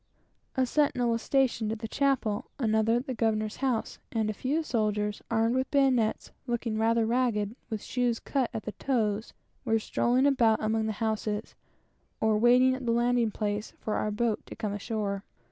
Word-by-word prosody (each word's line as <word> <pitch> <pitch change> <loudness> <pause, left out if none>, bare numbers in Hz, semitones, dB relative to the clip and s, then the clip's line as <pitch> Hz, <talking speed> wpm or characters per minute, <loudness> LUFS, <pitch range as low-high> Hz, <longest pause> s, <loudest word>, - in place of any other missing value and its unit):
A 260 - +3
sentinel 250 -3 +1
was 230 0 0
stationed 245 -5 +1
at 225 - -2
the 225 +1 -5
chapel, 260 -6 0
another 220 -2 +2
at 245 +2 -1
the 260 - -3
governor's 215 -2 0
house, 255 -4 -1
and 220 -2 0
a - - -6
few 280 +9 -1
soldiers 210 -5 -1
armed 225 +1 +2
with 260 0 0
bayonets, 260 -6 +2 0.2
looking 235 -2 -1
rather 225 0 +3
ragged, 230 -3 0
with 220 -3 -4
shoes 245 -2 0
out 265 -4 +2
at 225 -2 -5
the 215 - -4
toes, 220 -4 -1 0.3
were 225 -3 +2
strolling 245 +4 +1
about 235 -6 +4
among 220 0 0
the 220 - -1
houses, 215 -1 -2 0.7
or 220 -1 +2
waiting 250 +3 +5
at 260 0 -5
the - - +3
landing 240 0 +2
place 210 0 -3
for 215 - -3
our 215 - 0
boat 215 +1 -1
to - - -8
come 210 -3 -3
ashore. 205 -2 -3
225 Hz, 180 wpm, -28 LUFS, 215-250 Hz, 0.7 s, waiting